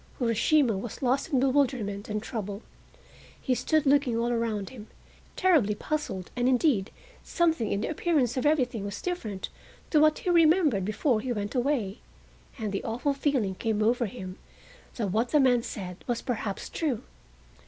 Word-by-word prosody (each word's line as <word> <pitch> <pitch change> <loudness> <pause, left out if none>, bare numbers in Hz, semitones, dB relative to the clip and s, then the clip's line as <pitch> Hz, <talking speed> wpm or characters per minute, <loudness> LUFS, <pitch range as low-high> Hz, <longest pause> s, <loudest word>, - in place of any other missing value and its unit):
Urashima 235 -1 +2
was 240 +5 -7
lost 265 +5 +1
in 265 - +3
bewilderment 255 -7 0
and 210 0 -2
trouble. 205 -3 -5 0.8
He 255 - 0
stood 310 +4 +1
looking 275 -4 +3
all 235 +1 0
around 225 -4 -1
him, 220 -4 -10 0.5
terribly 295 - +3
puzzled, 210 -9 -4
and, 245 0 +2
indeed, 250 -6 +2 0.3
something 325 - +1
in 200 - 0
the - - -1
appearance 305 -6 +1
of 255 - -1
everything 255 -8 +1
was 200 0 -5
different 225 - -4 0.4
to 305 - +5
what 310 0 +5
he 360 - -1
remembered 320 - +4
before 215 +3 +1
he 255 - -3
went 205 -3 -3
away, 245 -6 0 0.6
and 215 -4 -3
the 195 - -3
awful 245 +5 -1
feeling 270 -8 0
came 215 +2 -1
over 235 +1 +2
him 185 -4 -8 0.6
that 210 -6 -2
what 225 +5 +1
the 300 - +4
man 250 -3 +4
said 185 -5 -7
was 240 -2 -1
perhaps 220 -5 -3
true. 285 -9 -2
240 Hz, 165 wpm, -28 LUFS, 210-285 Hz, 0.8 s, to